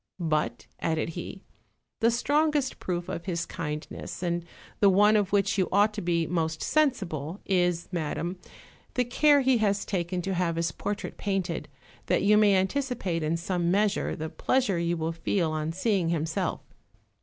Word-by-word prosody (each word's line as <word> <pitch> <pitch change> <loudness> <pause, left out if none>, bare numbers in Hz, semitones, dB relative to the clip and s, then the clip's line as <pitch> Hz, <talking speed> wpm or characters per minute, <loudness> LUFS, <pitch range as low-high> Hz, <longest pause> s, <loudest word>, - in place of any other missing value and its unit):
"But," 155 -3 -1
added 160 0 -1
he, 175 +3 -7 0.6
"the 230 - +4
strongest 290 +3 +1
proof 175 -1 -3
of 175 -2 -5
his 170 -2 -2
kindness, 155 +1 -6
and 175 -1 -1 0.4
the 200 - +6
one 205 +3 +5
of 205 -2 +2
which 200 0 +2
you 185 - +1
ought 205 +2 +4
to 210 - -4
be 170 -1 +1
most 160 -1 -1
sensible, 190 - 0
is, 175 -3 +1
madam, 175 +2 -3 0.6
the 250 - +2
care 290 +4 +4
he 260 -2 +3
has 200 -2 +1
taken 180 -1 -2
to 195 - -1
have 175 -2 0
his 165 0 0
portrait 205 0 -4
painted, 195 -4 -2 0.4
that - - +2
you 210 +1 +5
may 210 -2 +5
anticipate 195 -4 -1
in 155 +2 0
some 175 0 -1
measure 205 +2 +1
the 160 - -4
pleasure 245 -6 +1
you 170 0 0
will 160 0 -1
feel 165 0 0
on 155 0 -2
seeing 190 -1 +1
himself." 160 -1 -1
185 Hz, 165 wpm, -27 LUFS, 170-210 Hz, 0.6 s, the